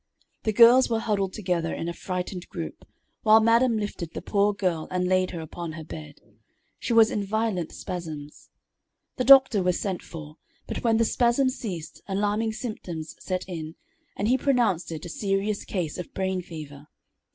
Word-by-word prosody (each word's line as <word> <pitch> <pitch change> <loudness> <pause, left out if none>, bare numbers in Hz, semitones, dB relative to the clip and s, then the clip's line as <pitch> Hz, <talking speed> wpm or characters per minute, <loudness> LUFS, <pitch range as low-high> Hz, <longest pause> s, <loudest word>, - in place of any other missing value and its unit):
The 220 - +2
girls 240 +4 +7
were 230 - +1
huddled 200 -4 0
together 175 -5 -1
in 165 - -4
a 170 - -2
frightened 180 0 -5
group, - - -7 0.4
while 220 -1 +7
madam 230 +1 +4
lifted 195 -5 -4
the - - -4
poor 205 0 +2
girl 180 -6 -1
and 180 0 0
laid 185 0 +2
her 170 - -5
upon 160 +1 -6
her 160 0 -7
bed. 150 -1 -9 0.6
She - - -3
was 225 -1 +6
in 205 - -1
violent 200 -4 -1
spasms. 155 -5 -7 0.7
The 255 - +1
doctor 265 -5 +7
was 180 -1 +1
sent 190 -3 -2
for, 155 -1 -10 0.3
but - - -5
when 225 -2 +3
the 230 - +3
spasms 250 +3 +2
ceased, 175 -8 -6
alarming 210 +3 0
symptoms 180 -9 -6
set 185 -1 -3
in, 160 -3 -6 0.4
and 205 - 0
he 255 +3 +3
pronounced 230 - +1
it 160 +1 -6
a - - -5
serious 200 +3 -1
case 175 -4 -3
of 180 - -8
brain 190 -1 -1
fever. 150 -4 -10
190 Hz, 175 wpm, -26 LUFS, 170-220 Hz, 0.7 s, girls